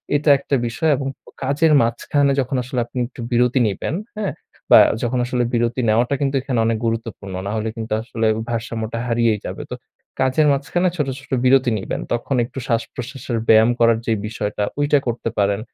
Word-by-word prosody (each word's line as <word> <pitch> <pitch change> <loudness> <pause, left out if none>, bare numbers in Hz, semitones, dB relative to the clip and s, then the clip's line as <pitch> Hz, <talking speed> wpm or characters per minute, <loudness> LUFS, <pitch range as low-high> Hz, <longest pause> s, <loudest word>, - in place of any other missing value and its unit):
এইটা 145 +1 +2
একটা 140 0 -1
বিষয় 155 +7 0
এবং 135 - -3 0.2
ও - - -12
কাজের 150 +4 +2
মাঝখানে 140 +5 +1
যখন 130 +1 -3
আসলে 125 0 -3
আপনি 120 - -11
একটু 125 - -11
বিরতি 125 +2 +3
নিবেন, 105 - -3 0.2
হ্যাঁ? 210 -2 -2 0.4
বা - - +10 0.2
যখন 125 +1 0
আসলে 125 0 0
বিরতি 120 +2 +1
নেওয়াটা 120 +5 +2
কিন্তু 140 -1 0
এখানে 130 -3 -1
অনেক 115 0 +1
গুরুত্বপূর্ণ। 115 -4 -4
নাহলে 110 +1 -2
কিন্তু 110 -2 -4
আসলে 115 -1 -2
ও - - -3
ভারসাম্যটা 115 -1 -3
হারিয়েই 115 -2 +2
যাবে। - - -5
তো - - -4 0.5
কাজের 130 +4 +3
মাঝখানে 165 +6 +1
ছোট-ছোট 135 -1 -4
বিরতি 130 -1 +4
নিবেন। - - -4
তখন 120 +3 -1
একটু 130 - -14
শ্বাসপ্রশ্বাসের 120 +1 -3
ব্যায়াম 110 +1 +7
করার 115 -1 +4
যে 115 - +1
বিষয়টা 105 -1 -3 0.2
ওইটা 145 0 +3
করতে 115 -1 -2
পারেন। 100 0 +2
120 Hz, 175 wpm, -20 LUFS, 115-135 Hz, 0.5 s, বা